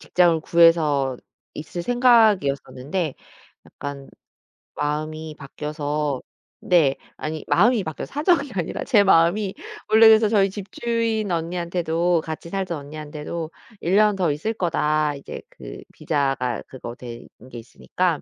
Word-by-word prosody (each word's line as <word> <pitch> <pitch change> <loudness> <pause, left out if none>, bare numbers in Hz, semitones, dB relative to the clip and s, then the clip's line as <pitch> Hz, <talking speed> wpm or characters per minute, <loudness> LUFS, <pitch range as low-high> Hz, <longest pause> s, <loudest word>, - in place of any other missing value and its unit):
직장을 170 -3 +2
구해서 155 -6 +3 0.4
있을 160 +3 -6
생각이었었는데 185 - +2 0.5
약간 140 -1 -8 0.7
마음이 155 +1 -3
바뀌어서 150 -1 -3 0.4
네. 160 -7 +3 0.2
아니 155 0 -5
마음이 220 +3 +4
바뀌어 160 -3 -5
사정이 295 -2 +1
아니라 175 -4 -3
제 210 -6 +4
마음이. 190 +2 +3 0.4
원래 220 +1 +7
그래서 220 -1 +6
저희 200 -3 +3
집주인 220 +2 -2
언니한테도 170 0 0
같이 160 +1 -6
살던 185 -3 -3
언니한테도 150 +2 -7 0.3
"1 180 +3 +1
년 210 -1 +4
더 175 -5 +1
있을 160 +10 -2
거다." 155 -6 0
이제 140 - -8
그 - - -10
비자가 135 -4 -1
그거 120 -2 -8
된 120 -1 -10 0.2
게 - - -8
있으니까 165 +7 -2
165 Hz, 285 characters per minute, -23 LUFS, 150-195 Hz, 0.7 s, 원래